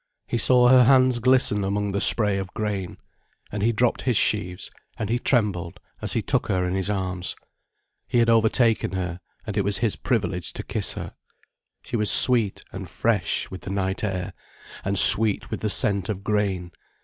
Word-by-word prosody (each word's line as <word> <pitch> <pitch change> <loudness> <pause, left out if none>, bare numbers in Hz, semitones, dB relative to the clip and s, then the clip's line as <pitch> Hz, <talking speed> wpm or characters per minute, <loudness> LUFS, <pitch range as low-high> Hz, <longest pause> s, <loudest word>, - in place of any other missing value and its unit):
He 120 - -3
saw 125 0 +4
her 130 -1 +6
hands 130 -1 +4
glisten 125 -4 +2
among 100 +1 -2
the 100 +1 -2
spray 105 -3 +3
of 95 0 -7
grain. 100 -4 -4 0.5
And 105 - -4
he 115 +3 +2
dropped 120 +2 0
his 125 -5 0
sheaves 90 -4 -2 0.3
and 110 0 -4
he 120 - 0
trembled 100 -10 -1 0.2
as - - -3
he - - -1
took - - -1
her 90 -1 -1
in 90 - -3
his 95 +1 -2
arms. 95 -3 -3 0.7
He - - -1
had 115 -1 +3
over 115 -1 +3
taken 115 -5 0
her, 90 -2 -4 0.3
and 105 - -6
it - - +3
was 100 +1 0
his 115 -3 0
privilege 100 -8 -2
to - - -7
kiss - - -1
her. - - -7 0.7
She - - -6
was 105 -2 0
sweet 115 0 +2
and - - -8
fresh - - -2
with 95 - -8
the - - -8
night 95 0 -3
air, 95 -3 -3 0.5
and 100 0 -2
sweet 110 +1 +6
with - - -5
the 110 - -1
scent 100 -2 +3
of 100 -2 -4
grain. 100 -4 -2
105 Hz, 190 wpm, -23 LUFS, 95-115 Hz, 0.7 s, her